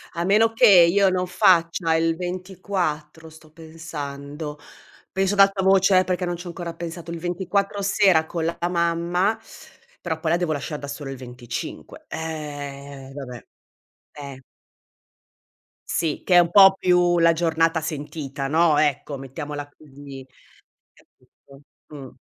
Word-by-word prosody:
A 170 - -2
meno 215 +4 +4
che 235 +2 +4
io 190 +1 +6
non 185 0 -1
faccia 170 -2 +2
il 165 0 +1
24 180 -4 -4
sto 160 0 -17
pensando, 150 -2 -8 0.5
penso 195 +1 0
ad - - -5
alta 195 -1 +5
voce 190 0 +5
eh, - - +2
perché 180 0 -2
non 175 0 -2
ci 175 +1 -9
ho - - -5
ancora 170 -1 -6
pensato, 170 0 -7
il 170 - -5
24 190 +3 -2
sera 195 -5 +3
con 165 0 -4
la 170 +1 -2
mamma, 175 +4 0 0.6
però 160 -1 -3
poi 160 0 -1
la 170 - +3
devo 175 -3 -1
lasciar 150 +1 -4
da 140 - -8
sola 140 -1 -6
il 135 - -7
25. 125 -1 -8
Eh, 140 -4 -7
vabbè, 125 -4 -8 0.7
eh. 140 -2 -9 1.5
Sì, 160 -3 -1
che 180 - +2
è - - +9
un 170 -1 +2
po' 195 -1 +8
più 175 -1 +3
la 165 0 +5
giornata 165 0 +1
sentita, 145 -3 -5
no, 160 +1 +3
ecco, 145 -1 0
mettiamola 145 +2 -7
così, 140 -2 -12 0.7
capito? 140 0 -22 0.3
Mh. 140 -4 -10
165 Hz, 145 wpm, -23 LUFS, 145-180 Hz, 1.5 s, è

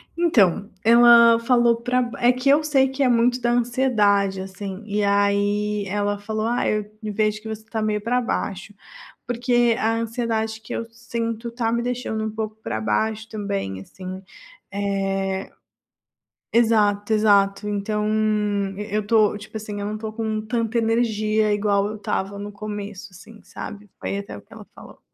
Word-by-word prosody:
Então, 210 - +3
ela 235 0 +7
falou 240 0 +3
pra 250 +1 +1
b 240 -1 -4
é 240 +1 +5
que 255 +2 0
eu 295 +2 +5
sei 275 -3 +3
que 270 +1 -1
é 255 - +3
muito 245 +1 +3
da 240 0 +1
ansiedade, 220 -6 +2
assim. 195 +1 -7
E 210 0 -1
aí, 205 +1 +1
ela 205 +1 -1
falou: 215 +1 -3
"Ah, 240 +1 0
eu 215 -1 0 0.2
vejo 215 0 -1
que 220 - -9
você 220 0 -6
tá 225 -1 -3
meio 210 -1 0
pra 245 +3 +1
baixo". 205 -4 -3 0.5
Porque 240 -1 +2
a 225 +1 +1
ansiedade 225 -1 -2
que 220 - -12
eu 230 - -3
sinto 230 0 -4
tá 230 -1 -1
me 235 0 0
deixando 245 -3 -3
um 220 - -2
pouco 215 0 -4
pra 110 - -3
baixo 215 - -1
também, 200 - -4
assim, 185 - -8 0.5
eh 195 -1 -2 1.0
exato, 215 -2 +3
exato. 205 -1 +3
Então, 210 +1 -1 0.7
e 210 +1 -6
eu 215 - +2
estou, 210 -1 +3
tipo 215 +1 -11
assim, 210 -1 -5
eu 200 - -3
não 210 - -3
estou 215 0 -5
com 220 -1 -2
tanta 230 0 -1
energia 220 -2 +1
igual 205 -1 +1
eu 215 - -5
estava 200 -1 -3
no 205 +1 -6
começo, 205 -1 -7
assim, 215 +4 -14
sabe. 205 -2 -9
Foi 200 - -3
até 200 - -7
o - - -11
que - - -26
ela - - -11
falou. - - -14
215 Hz, 170 wpm, -23 LUFS, 205-230 Hz, 1.0 s, ela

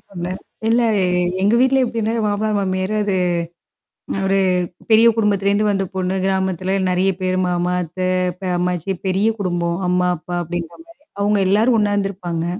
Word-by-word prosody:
சொன்னேன். 185 0 -5 0.3
இல்ல 235 +2 +3 0.2
எ - - +2 0.4
எங்க 205 +3 +3
வீட்ல 265 +1 +4
எப்டின்னா 230 -2 -2 0.2
மாமனாரு 210 +1 0
மாமியாரு 190 +1 -1
அது 200 -2 0 1.0
அ - - -2
ஒரு 195 0 +2 0.5
பெரிய 225 +1 +6
குடும்பத்திலேந்து 205 -1 +1
வந்த 195 -1 +1
பொண்ணு, 185 0 -1
கிராமத்தல 190 -1 0
நெறைய 185 +2 +2
பேரு 185 0 0
மாமா, 180 0 0
அத்தை, 185 +2 -4 0.3
பெ 190 - -5
அம்மாச்சி 180 +1 -1
பெரிய 190 +3 +1
குடும்பம். 175 -3 -1
அம்மா, 180 0 +2
அப்பா 175 +2 -6
அப்டிங்கற 170 - -6
மாரி. 335 -3 -20 0.2
அவங்க 205 0 +2
எல்லாரும் 225 +5 +3
ஒண்ணாருந்திருப்பாங்க. 195 -5 -1
190 Hz, 150 wpm, -19 LUFS, 180-210 Hz, 1.0 s, பெரிய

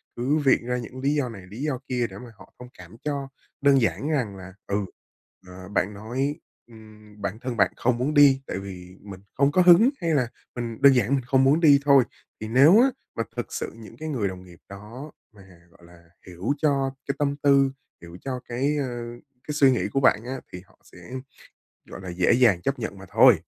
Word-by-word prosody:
cứ 135 +6 0
viện 135 -5 +2
ra 125 0 -1
những 125 +2 -8
lý 140 +2 +1
do 140 -4 -1
này, 100 -5 -10
lý 110 +6 -9
do 145 -4 -2
kia 125 -2 -1
để 95 - -11
mà 120 +2 -11
họ 95 - -18
thông 125 - -10
cảm 90 +2 -13
cho. 140 -2 -3 0.3
Đơn 140 -1 +4
giản 135 +5 -1
rằng 125 -10 -1
là, 95 0 -11
ừ, 100 0 -1 0.6
ờ, 90 0 -11
bạn 105 0 -1
nói, 125 +8 -3 0.3
ừm, 110 -2 -16
bản 100 +2 -4
thân 125 -1 -5
bạn - - +3
không 125 0 0
muốn 130 +5 -1
đi, 140 -2 +6
tại - - -4
vì 95 -1 -10
mình 100 -2 -10
không 140 +1 +2
có 180 - +3
hứng, 180 +7 +7
hay 165 -2 0
là 125 -4 +1 0.3
mình 115 -1 -5
đơn 140 -1 +7
giản 125 +3 +2
mình 130 - -2
không 130 +1 +3
muốn 140 +4 +4
đi 145 -4 +6
thôi. 140 -2 +6 0.4
Thì 110 - -4
nếu 140 - +6
á 265 - +5 0.3
mà 115 - -1
thực - - -5
sự - - -4
những 115 -2 -13
cái 155 0 -6
người 120 -9 -1
đồng 95 -1 -7
nghiệp 90 -2 -16
đó 110 +9 -10 0.2
mà, 100 - -15 0.3
gọi 85 0 -21
là, 85 0 -18 0.2
hiểu 90 +8 -3
cho 140 -3 +1 0.2
cái 140 - -2
tâm 145 -1 0
tư, 140 -1 +4 0.3
hiểu 85 0 -11
cho 130 -2 -4
cái, 140 +5 -1
ờ, 125 -4 -3 0.4
cái 150 - -3
suy 140 -3 +5
nghĩ 125 - 0
của 135 - +2
bạn 120 -4 +3
á, 130 +1 -5
thì 90 - -7
họ - - -28
sẽ, - - -18 0.9
gọi - - -9
là, 95 - -8
dễ 90 +1 +2
dàng 115 -8 +3
chấp 135 0 -2
nhận 110 -4 -5
mà 95 - -12
thôi. - - +6
125 Hz, 225 wpm, -24 LUFS, 100-140 Hz, 0.9 s, hứng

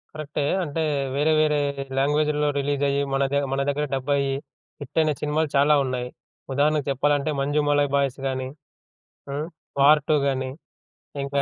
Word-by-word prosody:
కరెక్టే. 150 -1 -3 0.2
అంటే 160 0 -3 0.3
వేరే 150 +3 +2
వేరే 150 -1 +2 0.4
లాంగ్వేజిల్లో 150 +2 +2
రిలీజ్ 140 0 -1
అయ్యి 140 0 +1
మన 135 0 +2
దే 140 - +2
మన 135 0 0
దగ్గర 145 +1 0
డబ్ 135 +1 -3
అయ్యి 140 -1 0 0.5
హిట్ 145 +2 -9
అయిన 155 -1 +2
సినిమాలు 150 +1 0
చాలా 145 +2 +5
ఉన్నాయి. 125 -1 -3 0.4
ఉదాహరణకు 145 +1 +2
చెప్పాలంటే 145 +2 +1
'మంజుమలయ్ 145 0 +2
బాయ్స్' 140 -1 0
గాని, 130 -1 -2 0.8
హ్మ్, 145 +3 -3 0.3
'వార్ 150 +2 +6
2' 155 - +5
గాని. 130 -1 -1 0.7
ఇంకా 140 0 0
145 Hz, 145 wpm, -24 LUFS, 140-150 Hz, 0.8 s, వార్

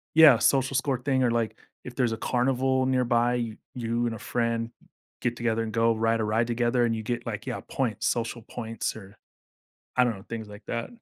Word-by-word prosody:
Yeah, 155 -7 +9
social 135 0 +2
score 130 -2 0
thing 130 0 +1
or, 120 - +3
like, 115 -2 -1 0.3
if 125 - -9
there's 120 -4 +1
a - - -3
carnival 130 +1 +2
nearby, 120 -2 +2
you 115 -3 -3 0.2
you 120 0 -1
and 115 - -2
a - - -9
friend 115 0 -1
n - - -24 0.3
get 120 -1 0
together 115 -1 0
and 110 - -5
go 115 0 +3
ride 115 +1 +1
a - - +1
ride 110 +2 +1
together 120 +1 +2
and 115 -1 0
you 110 - -3
get, 120 +2 -3
like, - - -4
yeah, - - -3
points, 115 -5 -1
social 115 -1 -1
points 115 -1 -4
or 100 -1 -12 0.8
I 125 - +6
don't 120 -2 0
know, 95 - -12
things 110 -2 -5
like 105 +1 -12
that. 115 -1 -3
120 Hz, 220 wpm, -27 LUFS, 115-125 Hz, 0.8 s, Yeah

